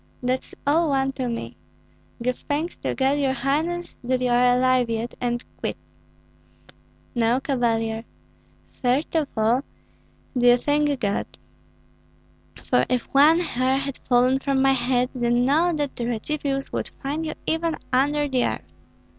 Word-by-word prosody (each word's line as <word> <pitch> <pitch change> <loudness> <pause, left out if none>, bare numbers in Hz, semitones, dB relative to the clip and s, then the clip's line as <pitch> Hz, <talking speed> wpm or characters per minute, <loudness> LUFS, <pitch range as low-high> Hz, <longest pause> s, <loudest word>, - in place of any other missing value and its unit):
"That's 255 +1 -2
all 315 +3 +3
one 270 -1 +1
to 260 -2 -3
me. 120 - -5 0.7
Give 250 +1 0
thanks 305 +7 -3
to - - -3
God, 270 +2 +2
your 270 -2 +1
highness, 310 +7 -1
that 255 +1 0
you 250 -1 0
are 245 +1 +4
alive 255 -1 +3
yet, 230 +1 -2
and 240 0 -1
quits." - - -3 1.4
"No, 235 +1 +2
Cavalier. 230 -5 0 0.8
First 265 +6 +1
of 310 -3 +2
all, 225 +4 +3 0.7
do 245 -1 +3
you 245 0 +7
thank 290 +1 +1
God; 200 -2 -1 1.4
for - - +2
if 250 -1 -2
one 305 +5 +6
hair 260 -5 0
had 275 -1 -4
fallen 255 +1 +3
from 275 -1 0
my 270 0 +4
head, 250 0 +1
then 240 -1 +1
know 320 +6 +3
that 295 -4 -2
the 235 - -3
Radzivills 275 +3 -2
would - - -2
find 295 +4 -2
you 315 - -3
even 325 0 0 0.2
under 290 +3 +2
the 260 -3 +1
earth. - - -3
265 Hz, 150 wpm, -24 LUFS, 245-290 Hz, 1.4 s, you